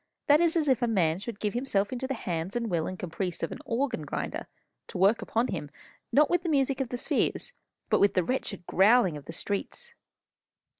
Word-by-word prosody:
That 295 +2 +5
is 340 -1 +3
as 310 -2 +1
if 260 -3 +3
a 240 - +2
man 180 -7 +2
should 210 0 -6
give 210 -1 -1
himself 235 -4 0
into 255 +1 -3
the 270 - -2
hands 180 -3 -3
and 235 -3 -1
will 165 -2 0
and 185 - -5
caprice 180 0 -4
of 165 - -2
an - - -6
organ 245 - -1
grinder, 145 - -4 0.4
to - - -7
work 195 +5 +4
upon 230 +3 0
him, 155 -7 -4 0.4
not 295 +1 +5
with 350 -1 +1
the 345 - -3
music 275 -2 +2
of 260 - -2
the 245 - -3
spheres, - - 0 0.3
but - - +3
with 200 - +4
the 185 - +3
wretched 200 -4 -3
growling 195 -2 +4
of 145 -1 -9
the - - -7
streets." 205 - -3
225 Hz, 215 wpm, -28 LUFS, 185-265 Hz, 0.4 s, That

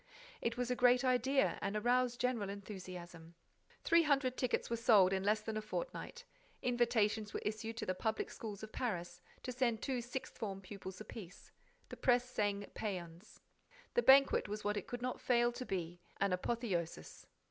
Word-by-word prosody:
It 230 +1 -1
was 250 0 -1
a - - +2
great 245 +1 +5
idea 260 +2 +2
and 200 - -2
aroused 245 +2 +2
general 240 -5 0
enthusiasm. 180 -4 -8 0.5
Three 335 0 +5
hundred 275 -5 +2
tickets 255 -2 0
were 235 - -1
sold 215 -5 +5
in 190 - +1
less 210 +2 +2
than 215 0 -4
a - - -1
fortnight. 485 - -5 0.4
Invitations 225 -4 +1
were - - -2
issued 220 +2 -3
to 225 - -3
the 185 - 0
public 220 +4 -2
schools 215 -2 -7
of 215 - -7
Paris, 180 -7 -3 0.2
to 255 - -3
send 240 -3 0
two 255 -3 -1
sixth 255 +2 -6
form 195 -3 -3
pupils 190 0 -8
apiece. 200 -4 -10 0.4
The - - -8
press 245 -1 +3
sang 205 -4 -1
pæans. 180 -2 -6 0.5
The 485 - +4
banquet 275 - +6
was 210 +1 -4
what 210 0 0
it 205 - -4
could 245 0 -5
not 255 0 -2
fail 240 -1 +3
to 245 +1 -6
be, 175 -2 -3 0.2
an 200 -2 +2
apotheosis. 180 -4 -3
220 Hz, 175 wpm, -36 LUFS, 195-250 Hz, 0.5 s, banquet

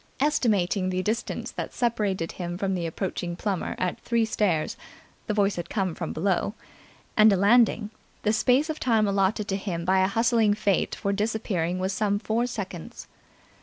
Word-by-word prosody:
Estimating 205 -10 +1
the 185 0 -1
distance 220 +4 -2
that - - -6
separated 205 -8 0
him 175 -1 -5
from 195 0 -1
the 175 -2 -2
approaching 175 0 -3
Plummer 195 0 -2
at 180 -1 -2
three 235 -1 +1
stairs 185 -8 0 0.5
the 210 - 0
voice 205 -2 +2
had 170 -1 -5
come 190 -5 -1
from 165 0 -4
below 190 +4 0 0.6
and 215 0 +7
a 195 - +3
landing, 215 +1 +4 0.3
the 215 - +2
space 255 +6 +3
of 315 -1 -4
time 225 -4 +2
allotted 200 +1 +1
to 195 - -1
him 180 -4 -3
by 190 +1 +3
a 190 - +4
hustling 225 0 +2
Fate 200 -3 0
for 200 - -1
disappearing 200 -5 -1
was 190 +1 -1
some 205 0 +1
four 225 +3 0
seconds. 190 -8 -7
200 Hz, 170 wpm, -26 LUFS, 185-220 Hz, 0.6 s, and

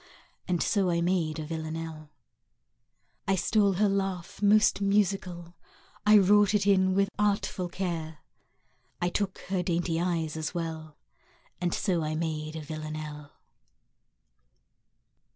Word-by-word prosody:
And 180 -3 +1
so 195 -4 +1
I 170 -1 +1
made 170 -3 0
a 155 - -4
Villanelle. 160 -1 -5 1.2
I 195 - +3
stole 200 +2 +2
her 205 +3 +2
laugh, 195 -2 -2
most 210 0 +4
musical: 190 -4 0 0.5
I 210 0 +8
wrought 205 +1 +5
it 200 -1 +2
in 190 -2 +3
with 200 0 +2
artful 200 -3 0
care; 170 -4 -4 0.8
I 175 - +1
took 195 +1 -2
her 190 -2 +1
dainty 170 -2 0
eyes 165 -3 -1
as 160 +2 -4
well; 160 -2 -5 0.6
And 175 -1 0
so 180 -3 0
I 155 0 -2
made 155 -1 -3
a 160 - -4
Villanelle. 155 -1 -7
175 Hz, 125 wpm, -28 LUFS, 160-195 Hz, 1.2 s, I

